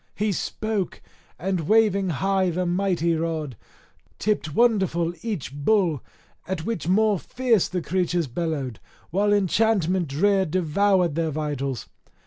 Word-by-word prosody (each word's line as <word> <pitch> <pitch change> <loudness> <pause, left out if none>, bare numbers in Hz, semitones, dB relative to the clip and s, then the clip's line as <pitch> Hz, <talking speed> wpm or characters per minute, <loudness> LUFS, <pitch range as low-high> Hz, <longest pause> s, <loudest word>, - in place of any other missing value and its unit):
He 210 +1 0
spoke, 210 0 -3 0.4
and 180 -4 -2
waving 210 -3 +3
high 190 +3 +1
the 180 +2 -1
mighty 175 -2 +1
rod, 160 -5 -3 0.6
tipped 185 -8 -1
wonderful 190 -8 +2
each 200 - -4
bull, 165 - +1 0.5
at 175 -4 -3
which 200 -9 -3
more 210 +1 +3
fierce 240 -3 +1
the 180 -2 -3
creatures 175 -1 0
bellowed, 140 - -3 0.3
while 205 +4 +2
enchantment 190 -3 +2
drear 190 +7 +2
devoured 185 +1 +2
their 165 +1 0
vitals. 140 -4 -3
180 Hz, 120 wpm, -24 LUFS, 160-200 Hz, 0.6 s, waving